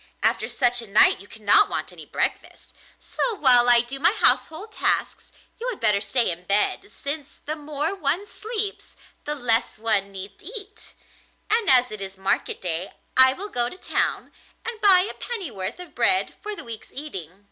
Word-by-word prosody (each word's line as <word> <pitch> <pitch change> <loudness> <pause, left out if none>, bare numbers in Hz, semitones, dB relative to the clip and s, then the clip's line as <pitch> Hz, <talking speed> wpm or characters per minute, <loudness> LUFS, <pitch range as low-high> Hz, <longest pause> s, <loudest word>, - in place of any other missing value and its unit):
After - - +3
such 245 -1 +1
a 230 - -9
night 205 +2 +5
you 200 - -14
cannot 220 - +3
want - - -4
any - - -13
breakfast; - - -3 0.2
so 470 - -2
while 250 -7 +6
I 240 -1 +7
do 255 +3 -8
my 345 +7 +3
household 420 -1 +1
tasks - - -2 0.3
you - - -3
had 470 - -6
better 210 -2 +2
stay 230 +3 +1
in 175 +1 -7
bed, 200 +2 0
since 285 +6 -7
the 305 - -2
more 300 +2 -2
one 355 +1 0
sleeps 425 -1 -5 0.3
the 295 - -2
less 240 -4 0
one 215 -3 0
need 195 +1 -9
eat; 420 +2 -8 0.6
and 445 -1 +2
as 250 -1 +4
it 215 -1 -8
is 195 0 -7
market 190 0 -1
day 175 +1 -2 0.2
I 260 0 +7
will 400 +8 -7
go 240 -7 0
to 365 - -12
town - - -2 0.3
and 460 -2 -6
buy 385 -3 +7
a 385 - -4
pennyworth 275 - -5
of 360 -4 -11
bread 375 0 +3
for 425 -1 -5
the - - -9
week's 230 -2 -10
eating. 195 - -8
270 Hz, 180 wpm, -23 LUFS, -, 0.6 s, I